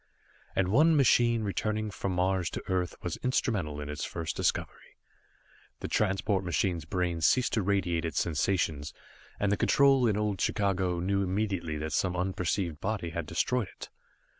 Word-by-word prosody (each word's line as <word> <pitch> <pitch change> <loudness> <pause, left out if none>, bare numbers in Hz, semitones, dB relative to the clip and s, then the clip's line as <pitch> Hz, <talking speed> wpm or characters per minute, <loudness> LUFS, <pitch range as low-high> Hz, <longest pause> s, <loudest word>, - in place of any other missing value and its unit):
And 95 -1 +1
one 155 - +5
machine 120 -4 +4
returning 105 +2 -2
from 100 -1 -3
Mars 90 -1 +1
to - - -6
Earth 90 -2 -1
was 90 - -3
instrumental 100 - -1
in 75 - -5
its 75 0 -4
first 80 -1 -4
discovery. - - -2 0.8
The - - -3
transport 95 -1 +1
machine's 90 -2 -1
brain 85 0 -1
ceased 125 +8 +3
to 110 - +2
radiate 90 -4 0
its 80 - -1
sensations, 80 -3 -1 0.5
and 100 -1 +1
the 105 - +2
control 135 -3 +4
in 105 -2 +1
old 105 -3 -1
Chicago 95 -3 0
knew 100 +3 0
immediately 95 -5 -1
that 75 0 -4
some 90 -1 0
unperceived 90 -2 -1
body 100 -5 -2
had 85 -2 -4
destroyed 110 +7 0
it. - - -11
95 Hz, 160 wpm, -29 LUFS, 85-105 Hz, 0.8 s, one